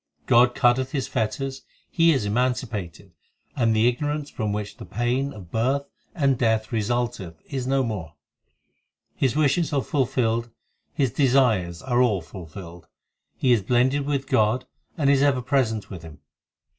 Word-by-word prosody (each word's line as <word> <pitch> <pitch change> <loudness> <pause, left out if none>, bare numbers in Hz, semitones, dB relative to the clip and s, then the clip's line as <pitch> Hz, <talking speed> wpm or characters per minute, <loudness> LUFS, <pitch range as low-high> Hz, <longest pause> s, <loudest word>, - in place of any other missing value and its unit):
God 120 +1 +4
cutteth 125 +2 +2
his 135 -3 -1
fetters, 135 +3 -2 0.3
he 165 0 +4
is 135 -8 +1
emancipated, 105 -6 -2 0.4
And 115 -4 +2
the 110 +2 +4
ignorance 145 +4 -2
from 110 -3 -2
which 105 0 -4
the - - -9
pain 120 +8 -1
of 95 -8 -12
birth 130 +5 0 0.3
and 140 -6 +1
death 110 -2 +1
resulteth 115 -6 -2
is 130 -2 -3
no 135 0 +2
more; 95 -9 -5 1.0
His 130 -1 0
wishes 155 +2 +2
are 140 -3 0
fulfilled, 120 -4 0 0.4
his 135 -5 0
desires 115 - +2
are 125 -1 +1
all 105 -7 +2
fulfilled; 85 0 -11 0.5
He 130 - +2
is 115 -3 +4
blended 130 +6 +1
with 140 -2 -1
God 110 +4 +1 0.3
and 145 -4 +1
is 140 -1 +4
ever 140 -2 +3
present 115 -6 0
with 90 -4 -7
Him. 80 -3 -12
120 Hz, 150 wpm, -24 LUFS, 105-135 Hz, 1.0 s, God